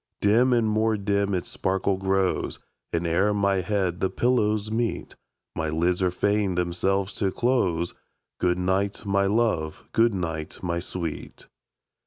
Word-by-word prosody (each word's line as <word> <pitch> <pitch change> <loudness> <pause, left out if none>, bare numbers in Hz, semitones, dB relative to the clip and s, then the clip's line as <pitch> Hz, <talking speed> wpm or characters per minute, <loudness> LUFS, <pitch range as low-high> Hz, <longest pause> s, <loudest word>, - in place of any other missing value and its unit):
Dim 115 +5 +4
and 120 -2 +3
more 110 0 +2
dim 100 0 0
its 90 - -3
sparkle 95 +1 0
grows, 95 0 0 0.3
And 85 +1 -1
ere 95 +5 +2
my 100 -1 +2
head 95 -2 -1
the 95 - +1
pillows 110 -1 +1
meet, 115 0 -2 0.4
My 80 -1 -1
lids 85 +4 +1
are 90 - +3
fain 100 +1 0
themselves 95 +3 0
to 100 - +2
close. 95 -7 0 0.5
Good 90 0 +2
night, 95 +3 -1
my 100 0 +2
love! 100 -8 0
good 115 -2 +3
night, 80 -3 -4
my 85 -1 -1
sweet! 85 -2 -6
95 Hz, 145 wpm, -25 LUFS, 90-105 Hz, 0.5 s, Dim